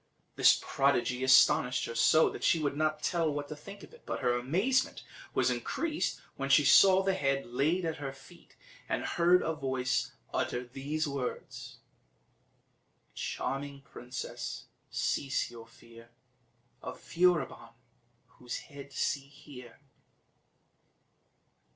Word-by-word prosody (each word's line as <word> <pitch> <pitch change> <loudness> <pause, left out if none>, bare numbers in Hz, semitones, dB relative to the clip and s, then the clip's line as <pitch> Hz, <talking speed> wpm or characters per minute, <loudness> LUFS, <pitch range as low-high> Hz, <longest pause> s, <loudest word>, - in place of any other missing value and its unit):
This - - +6
prodigy 130 -2 +1
astonished 130 -1 +5
her - - -5
so, 155 +7 +5
that - - -8
she 165 - +3
could 145 -2 -1
not 155 0 -1
tell 165 -2 +1
what 145 0 -4
to 150 - -5
think 200 +7 -11
of - - -14
it; 475 - -16
but - - -4
her 125 -2 +2
amazement 190 - 0 0.3
was - - +3
increased 325 -1 -2 0.2
when 135 0 -3
she 140 +1 +5
saw 190 +7 +7
the 195 0 +1
head 135 -6 0
laid 155 +9 0
at 160 -1 -2
her 140 -2 -5
feet, 135 0 -17 0.3
and - - -1
heard 175 +1 +3
a 160 - -1
voice 130 -4 -1 0.2
utter 125 0 -1
these 140 +5 -3
words: 140 -3 -5 1.4
"Charming 140 0 -4
princess, 125 -2 -7 0.2
cease 135 -3 -1
your 115 -1 -11
fear 115 0 -16 0.7
Of - - -7
Furibon; 170 -9 0 0.7
whose 125 -1 -5
head 140 -1 -11
see 140 +1 -2
here." 140 -4 -13
140 Hz, 130 wpm, -31 LUFS, 130-160 Hz, 1.4 s, saw